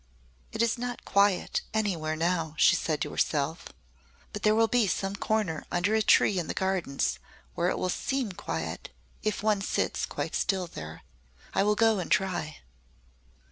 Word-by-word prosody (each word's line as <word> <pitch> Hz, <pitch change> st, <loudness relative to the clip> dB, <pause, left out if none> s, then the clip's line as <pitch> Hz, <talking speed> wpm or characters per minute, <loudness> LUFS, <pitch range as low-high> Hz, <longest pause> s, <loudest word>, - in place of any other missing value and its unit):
"It 220 Hz, -, 0 dB
is 235 Hz, +1 st, 0 dB
not 245 Hz, 0 st, -5 dB
quiet 200 Hz, -2 st, +2 dB
anywhere 170 Hz, -8 st, 0 dB
now," 165 Hz, -1 st, -1 dB
she -, -, +6 dB
said 155 Hz, -2 st, -1 dB
to -, -, -2 dB
herself. 150 Hz, +2 st, -1 dB, 0.7 s
"But 210 Hz, -, -5 dB
there 215 Hz, 0 st, +4 dB
will 225 Hz, 0 st, +4 dB
be 240 Hz, -2 st, +2 dB
some 195 Hz, +1 st, -1 dB
corner 200 Hz, -7 st, -1 dB
under 180 Hz, +4 st, +1 dB
a 220 Hz, -, +3 dB
tree 205 Hz, -2 st, +4 dB
in 170 Hz, -, -3 dB
the -, -, -4 dB
Gardens 190 Hz, -7 st, -1 dB, 0.3 s
where -, -, +1 dB
it -, -, -1 dB
will -, -, -1 dB
seem 260 Hz, +3 st, -1 dB
quiet 80 Hz, -, -5 dB, 0.3 s
if 215 Hz, 0 st, -2 dB
one 210 Hz, -2 st, +2 dB
sits -, -, -1 dB
quite -, -, -4 dB
still 190 Hz, -2 st, 0 dB
there. 80 Hz, -, -9 dB, 0.5 s
I -, -, +2 dB
will 210 Hz, +1 st, +3 dB
go 225 Hz, -2 st, +3 dB
and 175 Hz, -, -4 dB
try." 180 Hz, -6 st, 0 dB
195 Hz, 170 wpm, -28 LUFS, 160-215 Hz, 0.7 s, she